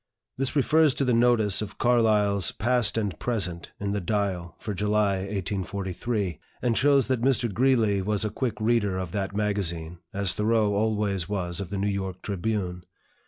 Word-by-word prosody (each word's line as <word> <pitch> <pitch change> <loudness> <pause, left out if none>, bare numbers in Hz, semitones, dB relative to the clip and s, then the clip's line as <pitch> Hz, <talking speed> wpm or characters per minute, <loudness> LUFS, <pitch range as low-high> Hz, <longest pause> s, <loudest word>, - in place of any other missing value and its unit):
This 135 +1 -2
refers 150 0 +4
to 140 - 0
the 125 - +2
notice 115 -4 +3
of 105 -1 -6
Carlyle's 105 -5 +3
"Past 120 -1 +1
and 105 -4 -2
Present," 95 -8 -2
in 100 0 -2
the 100 0 -1
"Dial" 95 -3 -2
for 105 - -5
July, 105 0 +1
1843, 95 0 -3 0.2
and 120 -2 +2
shows 140 -1 +4
that 130 -3 0
Mr. 120 -4 +1
Greeley 115 -4 +3
was 105 +2 -1
a 105 - -2
quick 130 -4 -2
reader 110 -4 +1
of 90 -3 -4
that 100 -1 -3
magazine, 90 -6 -1
as 100 -2 0
Thoreau 110 -1 +2
always 100 -4 0
was 90 -4 -2
of 95 -3 -5
the 100 - -3
"New 100 - -1
York 95 -2 -3
Tribune." 95 -3 -2
105 Hz, 165 wpm, -26 LUFS, 95-115 Hz, 0.2 s, refers